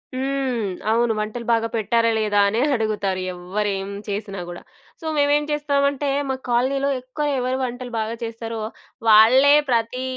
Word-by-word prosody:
హ్మ్. 260 -5 -1 0.2
అవును. 230 0 +2
వంటలు 215 +3 -4
బాగా 230 0 +2
పెట్టారా, 230 +1 +2
లేదా, 210 -1 +1
అనే 220 +4 0
అడుగుతారు 210 -4 -1
ఎవ్వరేం 195 +2 -3 0.2
చేసినా 200 -1 -4
గూడా. 175 - -8 0.4
సో, - - -9
మేమేం 290 +1 +3
జేస్తామంటే, 280 -1 0 0.2
మా 265 - 0
కాలనీలో, 270 +3 +1
ఎక్కువ 255 +4 -4
ఎవరు 255 +1 -1
వంటలు 245 0 -5
బాగా 220 +1 -2
చేస్తారో, 230 0 -5 0.5
వాళ్ళే 245 +7 +7 0.2
ప్రతి 235 +1 0
230 Hz, 135 wpm, -22 LUFS, 215-260 Hz, 0.5 s, వాళ్ళే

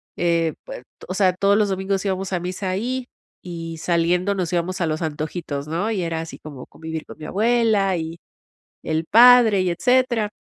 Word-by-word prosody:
eh, 170 -2 +1
pues, - - -9 0.3
o - - -2
sea, 190 -1 +3
todos 200 +2 +2
los 210 -1 +2
domingos 190 +1 -2
íbamos 190 0 -2
a 180 - 0
misa 185 +2 -4
ahí, 245 +7 -2 0.3
y 165 -2 -7
saliendo 175 +4 +1
nos 180 -3 -2
íbamos 175 +1 -1
a 170 - 0
los 155 +1 -2
antojitos, 155 -2 -4
¿no? 175 +8 -2
Y 205 -4 -1
era 165 -1 -2
así 165 - -9
como 140 -4 -10
convivir 160 -1 -7
con - - -12
mi 155 - -9
abuela, 215 -2 +2
y 165 0 -5 0.6
el 160 0 -2
padre, 230 0 +7
y 185 -1 0
etcétera. 240 +3 +1
185 Hz, 185 wpm, -22 LUFS, 165-205 Hz, 0.6 s, padre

